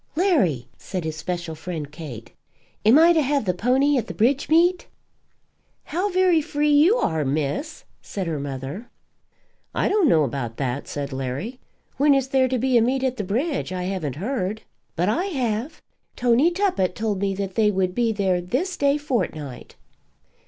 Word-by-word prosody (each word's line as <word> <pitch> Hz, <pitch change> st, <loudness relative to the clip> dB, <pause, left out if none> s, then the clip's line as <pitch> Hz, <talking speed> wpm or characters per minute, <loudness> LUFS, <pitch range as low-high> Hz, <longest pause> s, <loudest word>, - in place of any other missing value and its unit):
"Larry," 270 Hz, -, +2 dB
said 185 Hz, -3 st, -5 dB
his 160 Hz, -1 st, -3 dB
special 170 Hz, +1 st, -4 dB
friend 155 Hz, -2 st, -6 dB
Kate, 145 Hz, -9 st, -9 dB, 0.5 s
"am 225 Hz, +6 st, +6 dB
I 335 Hz, +2 st, +7 dB
to 320 Hz, -, +3 dB
have 280 Hz, -3 st, 0 dB
the 180 Hz, -, +1 dB
pony 260 Hz, +8 st, +2 dB
at 230 Hz, -, -5 dB
the -, -, -7 dB
Bridge 260 Hz, +6 st, +1 dB
meet?" 350 Hz, +3 st, +3 dB, 1.0 s
"How 365 Hz, +6 st, -2 dB
very 365 Hz, -3 st, +3 dB
free 295 Hz, 0 st, 0 dB
you 325 Hz, +11 st, +5 dB
are, 160 Hz, -, 0 dB
Miss!" 150 Hz, -, -2 dB, 0.2 s
said 195 Hz, -2 st, -5 dB
her 160 Hz, -3 st, -2 dB
mother. 140 Hz, -, -6 dB, 0.9 s
"I -, -, +1 dB
don't 395 Hz, -7 st, +3 dB
know 155 Hz, -7 st, +4 dB
about 120 Hz, -4 st, -4 dB
that," 135 Hz, 0 st, -3 dB
said 140 Hz, -1 st, -5 dB
Larry. 135 Hz, -, -4 dB, 0.4 s
"When 285 Hz, +1 st, +5 dB
is 270 Hz, -1 st, 0 dB
there 265 Hz, -1 st, +3 dB
to 255 Hz, 0 st, 0 dB
be 255 Hz, +1 st, +2 dB
a -, -, +5 dB
meet 260 Hz, +3 st, +1 dB
at 260 Hz, -1 st, 0 dB
the 210 Hz, -, -2 dB
Bridge? 245 Hz, -, -2 dB
I 180 Hz, -1 st, -3 dB
haven't 180 Hz, -8 st, -3 dB
heard." 210 Hz, -, -3 dB, 0.3 s
"But 175 Hz, +2 st, 0 dB
I 330 Hz, -, +1 dB
have. 255 Hz, -, -3 dB, 0.3 s
Tony 245 Hz, +6 st, +3 dB
Tuppett 350 Hz, -, 0 dB
told 215 Hz, -3 st, -1 dB
me 195 Hz, -1 st, -1 dB
that 195 Hz, -1 st, -4 dB
they 215 Hz, 0 st, +3 dB
would 185 Hz, -2 st, 0 dB
be 230 Hz, +2 st, +1 dB
there 190 Hz, -4 st, 0 dB
this 285 Hz, -, -2 dB
day 280 Hz, 0 st, +2 dB
fortnight." 180 Hz, -, -4 dB
220 Hz, 175 wpm, -23 LUFS, -, 1.0 s, I